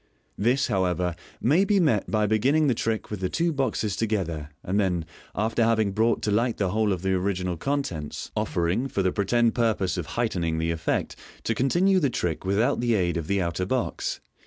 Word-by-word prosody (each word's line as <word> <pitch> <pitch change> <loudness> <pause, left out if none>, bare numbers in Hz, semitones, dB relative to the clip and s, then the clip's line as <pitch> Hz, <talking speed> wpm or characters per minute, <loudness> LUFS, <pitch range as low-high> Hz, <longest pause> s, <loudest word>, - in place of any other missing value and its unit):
This, 125 +6 +2
however, 90 -2 0 0.2
may 155 +10 +3
be 200 0 +3
met 140 - +2
by 110 -1 +2
beginning 130 +9 +3
the 135 - +3
trick 110 -1 -2
with 105 - -3
the 95 -1 -1
two 170 0 0
boxes 115 -7 -1
together, 85 -9 -2
and 95 +3 0
then, 90 -5 0 0.3
after 115 +2 +1
having 110 -3 +2
brought 110 +3 +1
to 105 - 0
light 115 +3 +1
the 95 -3 0
whole 110 0 +1
of 90 -2 -2
the 95 0 +1
original 90 -1 -1
contents, 90 - -3
offering 90 +10 0
(for 100 -7 -1
the 95 - +2
pretended 115 +4 +2
purpose 110 -6 +1
of 85 -3 -3
heightening 90 -9 0
the 80 +1 0
effect) 80 -1 -1 0.3
to 115 - 0
continue 175 - +3
the 145 -6 +2
trick 90 -8 -2
without 105 +8 +1
the 120 -1 +2
aid 90 -4 +1
of 85 -2 -3
the 100 -1 +1
outer 85 +2 -2
box. 130 +2 -2
105 Hz, 195 wpm, -26 LUFS, 90-120 Hz, 0.3 s, may